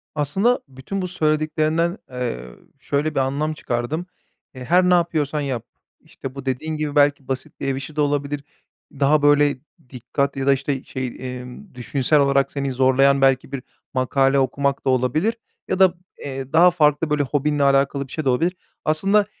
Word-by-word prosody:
Aslında 190 - +1
bütün 135 +9 -5
bu 180 - -2
söylediklerinden, 155 +1 0
ııı, 115 - -5 0.2
şöyle 145 +3 -1
bir - - +2
anlam 140 +4 -1
çıkardım. 145 +4 -3 0.5
Eee, 130 - -8
her 180 +6 +4
ne 180 - +5
yapıyorsan 155 -4 +1
yap, 130 -5 -3 0.4
işte, 135 0 -9
bu 140 -1 -8
dediğin 155 +4 -2
gibi, 150 -1 -3
belki 145 -2 +3
basit 130 -1 -5
bir - - -3
ev 135 - 0
işi 135 +3 -7
de 150 - +1
olabilir, 145 0 -1 0.5
daha 145 +2 +2
böyle, 145 -1 +4 0.3
dikkat 135 +3 -2
ya 135 - -2
da 140 - +6
işte 135 0 -2
şey, 130 -1 -4
emm, 125 +8 -8
düşünsel 130 +5 +1
olarak 140 -1 +2
seni 140 -2 -2
zorlayan 135 +2 +3
belki 135 0 +2
bir 135 -3 -5 0.3
makale 135 +1 +2
okumak 140 +1 0
da - - +2
olabilir 130 - +1 0.3
ya 190 - -1
da, 190 -2 +6 0.3
eee, 135 0 -6
daha 175 +3 +7
farklı 150 -2 +2
böyle 150 -1 +1
hobinle 145 +1 0
alakalı 140 0 +2
bir - - -18
şey 155 - -4
de - - +3
olabilir. 165 +9 +1 0.3
Aslında 195 +7 +3
140 Hz, 175 wpm, -22 LUFS, 135-155 Hz, 0.5 s, daha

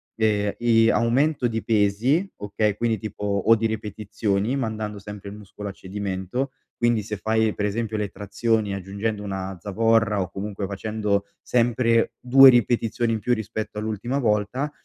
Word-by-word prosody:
ehm, 105 -2 +1
i 115 -1 +4
aumento 125 +4 +2
di 115 -1 -2
pesi, 115 - +2
okay, 105 0 -1
quindi 115 -1 0
tipo 105 0 -7
o 100 +3 +3
di 115 - -1
ripetizioni 105 +1 -2
mandando 110 -4 -3
sempre 105 0 -9
il 100 - -9
muscolo 105 0 -9
a - - -5
cedimento, 100 +6 -4 0.3
quindi 120 -2 +2
se 105 +1 -5
fai 110 +1 +1
per 105 - -2
esempio 110 +1 -2
le 105 -1 -1
trazioni 105 +1 -1
aggiungendo 100 +3 -3
una 95 -1 -4
zavorra 115 0 +2
o 90 - -3
comunque 100 0 -4
facendo 100 0 -1 0.2
sempre 115 -1 +2
2 135 +2 +8
ripetizioni 120 -1 +2
in 110 - -1
più, 125 +4 +1
rispetto 110 -1 -4
all'ultima 110 +4 -2
volta, 120 +5 0
110 Hz, 155 wpm, -24 LUFS, 100-115 Hz, 0.3 s, 2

